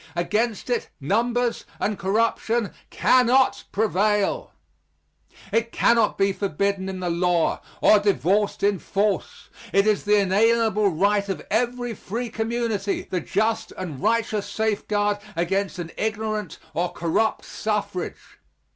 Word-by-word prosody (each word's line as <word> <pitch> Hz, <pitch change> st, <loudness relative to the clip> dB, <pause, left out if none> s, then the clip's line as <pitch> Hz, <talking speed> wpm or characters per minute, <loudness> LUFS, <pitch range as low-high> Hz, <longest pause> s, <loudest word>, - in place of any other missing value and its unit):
Against 215 Hz, +7 st, -1 dB
it, 240 Hz, -, -1 dB
numbers 235 Hz, -, 0 dB, 0.2 s
and 210 Hz, -, 0 dB
corruption 225 Hz, +2 st, 0 dB, 0.2 s
cannot 255 Hz, +1 st, +3 dB
prevail. 210 Hz, -, +1 dB, 1.0 s
It 230 Hz, 0 st, +1 dB
cannot 230 Hz, -2 st, +3 dB
be 195 Hz, 0 st, +2 dB
forbidden 195 Hz, 0 st, -1 dB
in 185 Hz, -1 st, -5 dB
the 180 Hz, -, -1 dB
law, 175 Hz, -1 st, +1 dB, 0.2 s
or 215 Hz, -, +6 dB
divorced 200 Hz, +2 st, +1 dB
in 200 Hz, -2 st, +2 dB
force. 200 Hz, +1 st, -2 dB, 0.2 s
It 200 Hz, +1 st, +3 dB
is 215 Hz, -2 st, +2 dB
the 210 Hz, 0 st, +4 dB
inalienable 215 Hz, +2 st, +3 dB
right 200 Hz, +4 st, +1 dB
of 195 Hz, -, -4 dB
every 245 Hz, +2 st, 0 dB
free 230 Hz, +4 st, -5 dB
community 225 Hz, -3 st, -1 dB
the 180 Hz, -2 st, 0 dB
just 220 Hz, +1 st, -1 dB
and 165 Hz, -8 st, -6 dB
righteous 215 Hz, -1 st, 0 dB
safeguard 205 Hz, -1 st, 0 dB, 0.2 s
against 190 Hz, +3 st, -1 dB
an 170 Hz, -2 st, -6 dB
ignorant 215 Hz, -3 st, -2 dB, 0.2 s
or 175 Hz, +3 st, -1 dB
corrupt 175 Hz, +7 st, 0 dB
suffrage. 210 Hz, -4 st, -4 dB
210 Hz, 120 wpm, -24 LUFS, 195-225 Hz, 1.0 s, or